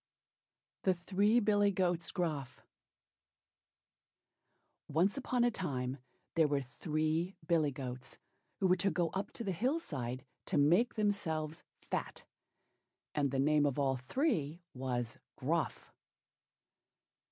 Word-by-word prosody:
THE 185 -1 +3
THREE 205 +6 +3
BILLY 205 -1 +4
GOATS 180 -3 0
GRUFF 155 -8 -3 2.2
Once 180 - +2
on 250 -2 +2
a 240 - +4
time 135 - -2 0.3
there 160 -2 +4
were 140 -1 +1
three 155 +6 -1
Billy 160 -3 +3
goats, 130 -1 -6 0.4
who 195 - +1
were 185 0 +5
to 195 +3 +2
go 175 -3 +1
up 195 +2 -3
to 235 - -4
the 200 - -1
hill 255 - +1
side 130 - -4 0.2
to 180 - +1
make 175 +12 +4
themselves 165 -7 0 0.3
fat, - - -2 0.9
and 145 -2 +2
the 135 - -1
name 145 +2 +4
of 140 - -1
all 135 -2 +2
three 170 - 0
was 125 -3 -2 0.2
"Gruff." - - -1
165 Hz, 120 wpm, -34 LUFS, 140-195 Hz, 2.2 s, were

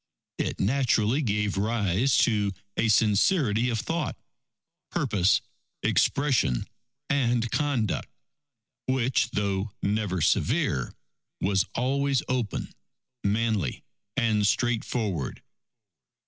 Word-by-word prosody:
It - - -2
naturally 120 +2 +2
gave 105 -5 0
rise 110 +3 +1
to 105 -4 0 0.2
a 115 - +1
sincerity 110 - +3
of 115 -2 -1
thought, 160 +7 -2 0.7
purpose, 105 - +2 0.4
expression 135 - +2 0.4
and 120 -4 +1
conduct, 135 - 0 0.8
which, 130 -2 +1
though 100 -1 -2
never 100 -2 0
severe, 65 -5 +1 0.4
was 95 0 +1
always 135 +1 +1
open, 125 -5 -2 0.5
manly, 105 - 0 0.3
and 110 -5 +2
straightforward. 105 - -1
110 Hz, 85 wpm, -27 LUFS, 100-130 Hz, 0.8 s, sincerity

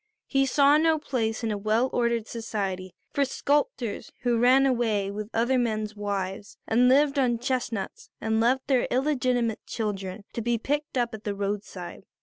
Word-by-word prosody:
He 270 -1 +2
saw 280 +2 +5
no 320 0 +3
place 240 -6 -2
in 225 - 0
a 205 - -2
well 215 +5 +2
ordered 235 -2 +1
society 195 -5 -4 0.2
for 280 - +2
sculptors 275 -4 -1
who 240 -2 +1
ran 255 +3 +5
away 225 -6 +1
with 210 +1 -5
other 240 +3 +2
men's 215 -3 -1
wives 200 -1 -4
and 245 +3 +4
lived 280 +1 +4
on 245 -3 +2
chestnuts 245 -4 -3
and 220 0 0
left 255 +3 +2
their 260 -3 +2
illegitimate 250 -4 0
children 200 -3 -4
to 235 - -3
be 235 +1 +1
picked 290 +4 -2
up 240 -1 0
at 220 -1 -8
the 205 -1 -3
roadside. 200 -2 -5
235 Hz, 165 wpm, -26 LUFS, 210-260 Hz, 0.2 s, saw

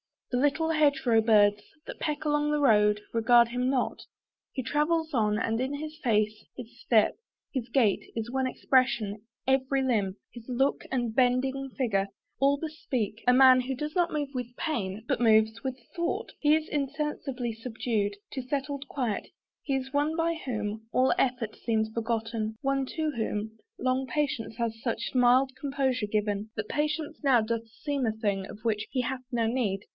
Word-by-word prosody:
The 250 - +1
little 290 +4 +2
hedge 295 -4 +2
row 230 -2 +5
birds, 210 -2 +4 0.2
That - - -8
peck 300 -1 -2
along 295 -1 +1
the 300 0 +1
road, 210 -5 +4
regard 235 +1 +5
him 250 +1 0
not. 265 -2 0 0.5
He 260 - -3
travels 315 +4 0
on, 210 -4 +2
and 225 +1 0
in 265 +3 -1
his 310 +1 -6
face, 215 -4 0
his 240 0 -10
step, 220 -3 +3 0.4
His 255 -4 -2
gait, 235 -5 +2
is 225 +1 -3
one 265 0 0
expression; 235 -6 +1 0.2
every 265 0 +2
limb, 210 -7 +1 0.2
His 235 -2 -12
look 265 +2 +1
and 240 -4 -1
bending 265 +2 +1
figure, 200 -7 +1 0.3
all 280 +1 +4
bespeak 255 -9 -3
A 250 - +7
man 260 0 +8
who 265 +1 -3
does 300 +3 -4
not 350 -2 +2
move 295 -2 -1
with 245 -1 -5
pain, 220 - -3
but - - 0
moves 220 -1 +4
With 260 -1 -3 0.2
thought 340 +1 -2
He 300 0 +4
is 315 0 -2
insensibly 275 -4 -2
subdued 220 -3 -2 0.2
To 265 - -3
settled 280 +2 -3
quiet: 245 -8 -2 0.3
he 275 - -1
is 265 +1 -4
one 295 +2 +1
by 335 0 +1
whom 215 -2 -3
All 255 +1 +4
effort 245 -4 0
seems 220 -2 0
forgotten, 225 -1 -2
one 275 0 +1
to 315 -1 0
whom 220 -3 -3 0.2
Long 255 +1 0
patience 275 -7 -2
has 225 -1 -2
such 230 -1 -2
mild 255 +1 +4
composure 265 -5 0
given, 210 0 -1
That 215 -1 -4
patience 305 +1 -1
now 265 -5 +4
doth 230 +1 -2
seem 275 +4 -3
a 220 - +1
thing, 200 -3 -1
of 205 - -10
which 215 -2 0
He 260 - 0
hath 255 +1 -3
no 235 -2 +1
need. 225 -5 0
250 Hz, 175 wpm, -28 LUFS, 220-275 Hz, 0.5 s, man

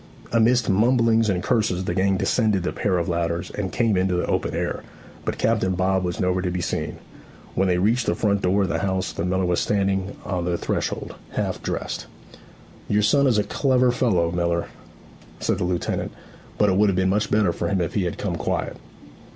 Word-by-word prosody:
Amidst 115 0 +3
mumblings 115 +1 +3
and 90 -3 0
curses 105 -7 +1
the 85 - -2
gang 95 +1 +2
descended 105 -3 +1
the 90 - -1
pair 95 -3 0
of 85 - -1
ladders 85 0 -1
and 95 -3 -3
came 115 -3 +1
into 90 0 +1
the 90 - 0
open - - -1
air; - - -2 0.4
but - - -2
Captain 105 -5 +1
Bob 95 +1 +1
was 90 -1 -3
nowhere 90 0 +1
to 90 - -1
be 90 0 -2
seen. 85 - -3 0.6
When 95 - +1
they 90 -1 +2
reached 115 +6 +1
the - - +2
front 100 -2 +1
door 100 +2 +2
of 95 - -1
the 80 - 0
house 95 0 -1
the 85 - -3
miller 95 +1 0
was 90 -1 +1
standing 100 -1 0
on 90 -3 -2
the 90 -1 0
threshold, - - -3 0.2
half - - -2
dressed. - - -4 0.8
'Your 105 +1 +2
son 140 +7 +4
is 120 -5 +3
a 105 - +3
clever 130 -1 +2
fellow, 95 -10 +1
miller,' 85 -1 -1 0.7
said - - 0
the - - 0
lieutenant; 90 -1 -2 0.5
'but 105 - +3
it 95 - +2
would 105 0 +4
have 95 - 0
been 95 0 +2
much 105 +2 +1
better 105 -5 +2
for - - -2
him 100 -2 0
if 85 -3 -2
he 100 -4 0
had 85 - -3
come - - -2
quiet.' - - -2
95 Hz, 210 wpm, -23 LUFS, 90-105 Hz, 0.8 s, son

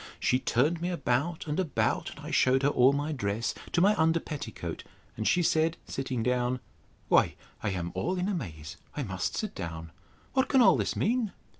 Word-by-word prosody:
—She 125 - +2
turned 150 +8 +1
me 175 - -1
about 155 0 -1
and 150 +2 -2
about, 170 -7 0
and - - -11
I - - -5
shewed 130 +1 +3
her 140 - +4
all 130 -1 +5
my 145 +2 -1
dress, 115 -5 -1 0.2
to 175 - +2
my 200 +3 +6
under 165 +1 +3
petticoat: 110 - -6 0.3
and 110 - -2
she 175 - +3
said, 160 +1 +2
sitting 130 -3 -3
down, 125 +1 +1 0.5
Why, - - +4 0.3
I - - -1
am 90 -3 -3
all 185 +2 -1
in 180 +1 0
amaze, 80 - -5 0.2
I 145 - -1
must 95 -5 -3
sit 215 - -3
down. 80 -3 -6 0.4
What 265 0 +2
can 270 - +4
all 240 - +7
this - - -1
mean? 230 -1 0
140 Hz, 190 wpm, -29 LUFS, 115-170 Hz, 0.5 s, all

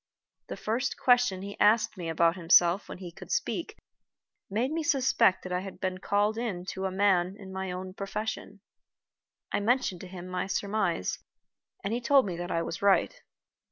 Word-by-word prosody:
The - - -6
first 240 +5 -2
question 245 -7 +3
he 200 0 -8
asked 215 +2 +4
me 175 -4 -5
about 165 +1 +3
himself 175 +2 +4
when - - -7
he 180 -2 -8
could - - -11
speak 425 +5 -2 0.7
made 230 +7 0
me 325 +1 -1
suspect 255 -9 +3
that 185 - -7
I 180 - 0
had 190 0 -8
been 185 -1 -2
called 205 +3 +1
in 195 -7 -3
to 190 0 -4
a 190 - -1
man 190 -1 +2
in 190 -2 -10
my 190 -1 -3
own 185 +1 -6
profession. 205 0 -5 0.9
I - - +1
mentioned 210 -4 +1
to 185 - -8
him 180 -1 -9
my 185 0 -3
surmise, 195 - -1 0.6
and 200 - -2
he 240 - -1
told 270 +1 +4
me 185 -3 -3
that 175 +1 -5
I 165 -1 0
was 165 - -5
right. 200 - +2
195 Hz, 185 wpm, -29 LUFS, 180-220 Hz, 0.9 s, asked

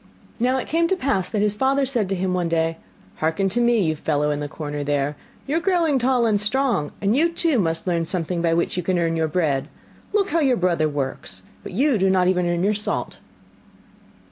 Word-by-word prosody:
Now 255 +3 +2
it 260 - -3
came 335 +1 +1
to 380 - +1
pass 260 - -1
that 210 -2 0
his 210 -1 +2
father 270 +5 +1
said 240 -7 -1
to 195 - 0
him 185 0 -1
one 175 -2 0
day: 165 0 0 0.4
'Hearken 160 +5 0
to 240 +6 0
me, 235 -3 +3
you 155 -2 0
fellow 150 -1 0
in 145 - -2
the 145 - -3
corner 145 -1 -5
there, 145 0 -1 0.3
you 285 - -2
are - - +2
growing 340 -6 +2
tall 250 -1 +2
and 210 -2 +2
strong, 220 - 0
and 205 +3 +2
you 330 +4 +3
too 330 -6 +1
must 165 -3 -1
learn 170 -3 0
something 175 -1 -1
by 165 -1 +2
which 170 - 0
you - - +1
can 185 0 0
earn 165 -1 0
your 160 -1 +1
bread. 150 -4 0 0.4
Look 405 -1 +1
how 335 - +2
your 270 -5 +2
brother 170 -4 +1
works, 135 -10 -5 0.2
but - - -9
you 260 +2 +2
do 190 +1 +3
not 185 -1 +3
even 180 -1 +1
earn 175 0 0
your 205 +2 +2
salt. 210 0 -3
185 Hz, 225 wpm, -22 LUFS, 165-255 Hz, 0.4 s, me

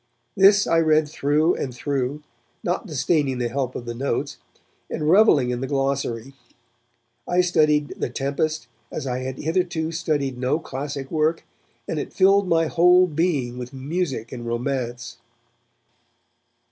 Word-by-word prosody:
This 200 +1 +6
I 165 0 +3
read 155 -1 +3
through 150 +3 +1
and 130 - -3
through, 140 +2 -3 0.4
not 180 +4 -2
disdaining 145 -3 0
the 120 -1 -1
help 130 0 -3
of 120 - -6
the 120 - -4
notes, 135 +4 -3 0.5
and 150 -1 -3
revelling 160 - +5
in 125 0 -3
the 135 - -2
glossary. 135 -2 -2 0.9
I 180 +1 +3
studied 150 -4 +2
The - - -4
Tempest 140 +5 -2 0.2
as - - -5
I 125 -1 -2
had 130 0 -5
hitherto 165 0 -1
studied 145 -6 -2
no 130 +4 +1
classic 140 -2 -6
work, 160 +1 0 0.4
and - - -2
it - - -6
filled 195 0 +4
my 165 -1 +3
whole 180 +3 +5
being 150 -7 -1
with 125 +2 -7
music 135 -4 -3
and 120 -2 -7
romance. 120 0 -3
145 Hz, 145 wpm, -23 LUFS, 130-165 Hz, 0.9 s, This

